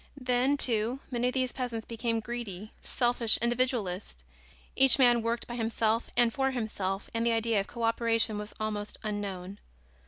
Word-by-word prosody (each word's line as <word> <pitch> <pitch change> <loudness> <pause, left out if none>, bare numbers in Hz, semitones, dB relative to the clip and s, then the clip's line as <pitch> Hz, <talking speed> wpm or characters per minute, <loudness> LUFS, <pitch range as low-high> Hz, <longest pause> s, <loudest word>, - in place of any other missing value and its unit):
Then, 255 +2 +2
too, 235 0 +2
many 245 0 0
of 250 - -2
these 255 -1 +1
peasants 240 -4 -4
became 230 0 -2
greedy, 215 -3 -6
selfish 240 -2 +1
individualists. 235 -6 -1 0.5
Each 265 -1 +6
man 240 -3 +5
worked 230 +1 -2
by 240 - -7
himself 225 0 0
and 240 -1 +4
for 270 0 +1
himself 210 -6 -3
and 230 0 0
the 235 0 +2
idea 225 -1 +1
of 195 - -3
co 235 - -6
operation 230 -1 +1
was 210 0 -7
almost 210 -1 -3
unknown. 200 -2 -4
230 Hz, 160 wpm, -29 LUFS, 215-245 Hz, 0.5 s, Each